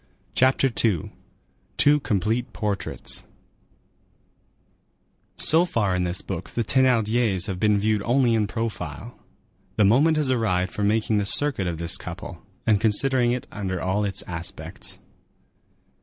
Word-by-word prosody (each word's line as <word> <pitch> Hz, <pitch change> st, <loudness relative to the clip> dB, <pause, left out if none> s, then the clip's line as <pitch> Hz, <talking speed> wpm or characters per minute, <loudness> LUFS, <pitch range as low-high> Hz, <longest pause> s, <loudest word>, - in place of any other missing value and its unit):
CHAPTER 130 Hz, +3 st, +3 dB, 0.2 s
II—TWO 115 Hz, -, -1 dB
COMPLETE 115 Hz, +1 st, -1 dB
PORTRAITS 105 Hz, -3 st, -3 dB, 2.2 s
So 165 Hz, +2 st, +6 dB
far 105 Hz, -, 0 dB
in 90 Hz, 0 st, 0 dB
this 90 Hz, +1 st, -3 dB
book -, -, -6 dB
the 115 Hz, -, -2 dB
Thénardiers 115 Hz, -6 st, +2 dB
have 95 Hz, -3 st, -3 dB
been 105 Hz, 0 st, +3 dB
viewed 105 Hz, 0 st, +1 dB
only 120 Hz, +2 st, +2 dB
in 110 Hz, -2 st, +1 dB
profile; 110 Hz, -, -5 dB, 0.6 s
the 105 Hz, -, +3 dB
moment 145 Hz, +10 st, +4 dB
has 145 Hz, -4 st, +1 dB
arrived 95 Hz, -7 st, 0 dB
for -, -, -4 dB
making 110 Hz, +1 st, +1 dB
the 100 Hz, -, -1 dB
circuit 135 Hz, -7 st, +2 dB
of 85 Hz, -2 st, -3 dB
this 85 Hz, +1 st, -1 dB
couple, -, -, -8 dB, 0.2 s
and 105 Hz, -2 st, +3 dB
considering 120 Hz, +3 st, +3 dB
it 125 Hz, 0 st, -3 dB
under 95 Hz, -3 st, -4 dB
all 95 Hz, +4 st, -1 dB
its 100 Hz, -1 st, -1 dB
aspects. 85 Hz, -1 st, -5 dB
110 Hz, 130 wpm, -24 LUFS, 95-125 Hz, 2.2 s, So